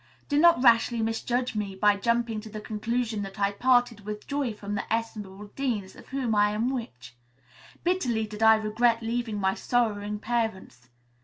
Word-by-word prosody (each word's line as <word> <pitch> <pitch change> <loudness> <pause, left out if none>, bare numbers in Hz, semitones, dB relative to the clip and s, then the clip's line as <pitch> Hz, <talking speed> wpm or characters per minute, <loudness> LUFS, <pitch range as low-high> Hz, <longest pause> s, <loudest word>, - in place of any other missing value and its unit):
Do 290 0 +2
not 340 -5 +5
rashly 235 -1 +4
misjudge 240 +3 -1
me 200 -2 -3
by 205 +1 +4
jumping 235 +1 0
to 220 - -10
the 215 0 -7
conclusion 220 +1 -2
that 195 0 -7
I 200 0 +2
parted 245 +1 +2
with 210 +1 -6
joy 280 -4 -1
from 205 -1 -6
the 205 - -4
estimable 210 -3 -4
Deans 220 -9 -2
of - - -14
whom 260 -4 -2
I 210 0 +3
am 230 +4 0
which. 125 - -6 0.7
Bitterly 255 -12 0
did 210 0 -9
I 220 0 +7
regret 225 +2 +1
leaving 225 -2 -2
my 190 -1 +1
sorrowing 210 -4 -1
parents. 210 - -3
220 Hz, 170 wpm, -27 LUFS, 205-240 Hz, 0.7 s, I